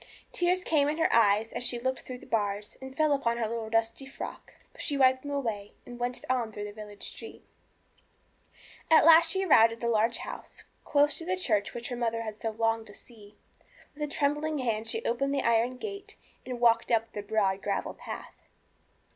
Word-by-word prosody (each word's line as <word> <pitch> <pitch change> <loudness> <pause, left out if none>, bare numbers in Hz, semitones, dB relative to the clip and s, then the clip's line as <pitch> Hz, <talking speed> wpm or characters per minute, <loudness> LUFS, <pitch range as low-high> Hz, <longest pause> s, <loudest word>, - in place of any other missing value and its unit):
Tears 360 +1 +1
came 295 -4 +2
in 305 - -2
her 325 - +2
eyes 220 -1 +4
as - - -3
she 245 0 +1
looked 260 +2 -2
through 255 - -8
the - - -15
bars, 205 -2 -2
and 265 0 -9
fell 310 -1 +3
upon 235 -4 0
her 230 -2 0
little 225 0 -4
dusty 225 +4 0
frock. 270 - -8 0.2
But - - -10
she 285 - -1
wiped 260 -1 +4
them 285 - -7
away, 225 -8 -3
and 245 0 -10
went 245 +1 -3
on 250 -3 0
through 205 -1 -6
the 210 - -6
village 210 -1 -9
street. - - -7 1.4
At 320 -2 +7
last 330 0 +8
she 385 +2 0
arrived 230 -9 +6
at 230 - -11
the 235 - -2
large 230 0 +2
house - - -8 0.2
close 290 0 +3
to 330 - -6
the 370 +1 -1
church 215 - 0
which 240 0 -5
her 245 - -3
mother 230 -1 -1
had 215 -1 -7
longed 220 -1 -3
so 225 0 +2
much 220 - -14
to 205 - -12
see. 210 -3 -15 0.6
With 300 - -13
a 295 - 0
trembling 295 +1 0
hand 225 -4 -1
she 455 - -3
opened 275 +4 0
the 275 - 0
iron 235 +2 +2
gate 405 +4 -7 0.3
and 250 -2 -4
walked 235 -1 +3
up 225 -1 +1
the 205 - -4
broad 200 -2 0
gravel 200 0 -2
path. - - -9
240 Hz, 210 wpm, -29 LUFS, 220-285 Hz, 1.4 s, last